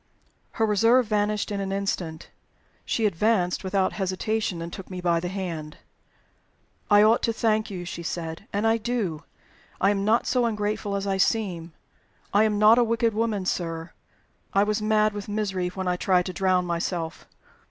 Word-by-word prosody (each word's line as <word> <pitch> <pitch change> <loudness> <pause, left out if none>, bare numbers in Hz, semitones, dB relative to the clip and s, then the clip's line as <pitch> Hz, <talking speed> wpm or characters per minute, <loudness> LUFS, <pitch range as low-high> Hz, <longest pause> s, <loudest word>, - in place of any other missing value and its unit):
Her 225 - +1
reserve 230 +4 +4
vanished 210 0 0
in 200 - -2
an 195 0 -3
instant. 185 -5 -3 0.5
She 225 - 0
advanced 200 -1 +1
without 190 0 0
hesitation, 190 0 -2
and 170 +1 -6
took 190 - -8
me 185 -1 -6
by 170 -1 +1
the 175 - -4
hand. 170 -5 -5 1.1
"I 205 0 +7
ought 220 +2 +4
to 230 - +1
thank 220 -1 0
you," 180 -3 -6
she 170 - -6
said. 165 +2 -5
"And 205 +2 -1
I 225 0 +4
do. 215 -9 -2 0.6
I 195 - +4
am 195 -1 -1
not 220 +3 +2
so 250 -2 +2
ungrateful 210 -2 -2
as 200 0 -2
I 195 -1 0
seem. 180 -5 0 0.6
I 210 +2 +5
am 210 -1 +1
not 215 +3 +6
a - - +5
wicked 230 0 +1
woman, 215 -3 -1
sir 165 -2 -3 0.6
I 200 - +5
was 210 +1 0
mad 215 0 +2
with 205 0 -6
misery 195 -4 -1
when 185 +1 -4
I 180 0 +1
tried 180 -1 +2
to 185 - -4
drown 185 0 +1
myself. 170 -1 -3
200 Hz, 175 wpm, -25 LUFS, 180-215 Hz, 1.1 s, I